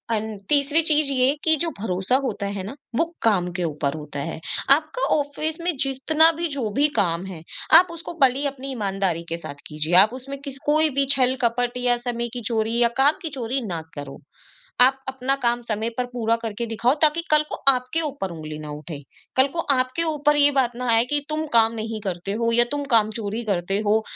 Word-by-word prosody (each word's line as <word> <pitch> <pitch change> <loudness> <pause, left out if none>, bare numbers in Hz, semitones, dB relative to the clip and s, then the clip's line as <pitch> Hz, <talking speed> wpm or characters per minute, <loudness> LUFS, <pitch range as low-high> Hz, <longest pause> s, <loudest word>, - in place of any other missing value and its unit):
And 215 -1 -4
तीसरी 290 +2 +4
चीज़ 305 -3 +3
ये 255 -1 +3
है 280 - +2
कि 320 -1 +5
जो 335 - 0
भरोसा 190 +2 0
होता 205 -5 -3
है 190 - -4
ना, 210 +8 -7 0.2
वो 330 - +2 0.2
काम 185 -6 +2
के 180 - -1
ऊपर 150 -3 -2
होता 150 -2 -7
है। - - -6 0.4
आपका 310 - -5
ऑफिस 305 +3 -3
में 345 -1 -1
जितना 305 +5 +3
भी 340 - 0
जो 230 -5 -1
भी 295 - +5
काम 170 -1 0
है, 180 -4 -9 0.4
आप 365 - +2
उसको 335 0 -8
बड़ी 270 +2 +3
अपनी 275 0 -6
ईमानदारी 195 -7 -2
के 170 - -2
साथ 145 - -8
कीजिए। 155 +3 -1
आप 215 - -1
उसमें 270 +2 -7
किस 270 -1 -4
कोई 310 +1 +3
भी 275 - +3
छल-कपट 245 -2 +1
या 245 -1 +1
समय 235 0 -2
की 245 - -4
चोरी 225 0 0
या 240 - +5
काम 285 +3 +3
की 325 - -3
चोरी 250 +3 -2
ना 170 -4 -4
करो। 145 -1 -8 0.6
आप 265 +2 +5
अपना 265 +1 -1
काम 240 0 +1
समय 220 0 -2
पर 250 - 0
पूरा 230 -1 +1
करके 225 +1 -3
दिखाओ 235 +3 +1
ताकि 315 +2 +3
कल 305 0 +6
को - - -3 0.2
आपके 255 +5 -2
ऊपर 280 - -4
ऊँगली 155 -2 -7
ना 150 - -8
उठे। 150 +1 -7 0.4
कल 265 +1 +5
को 335 - -2 0.2
आपके 255 +5 0
ऊपर 295 -2 +1
ये 290 0 +5
बात 255 -4 +1
ना 250 0 -4
आए 225 0 +4
कि 290 +3 0
तुम 310 +1 -2
काम 225 -1 +4
नहीं 220 0 -4
करते 190 0 -4
हो 230 0 +1
या 240 +1 +5
तुम 290 0 -2
काम 220 -2 +4
चोरी 220 +1 -4
करते 195 0 0
हो, 220 +1 +3
245 Hz, 215 wpm, -23 LUFS, 205-280 Hz, 0.6 s, कल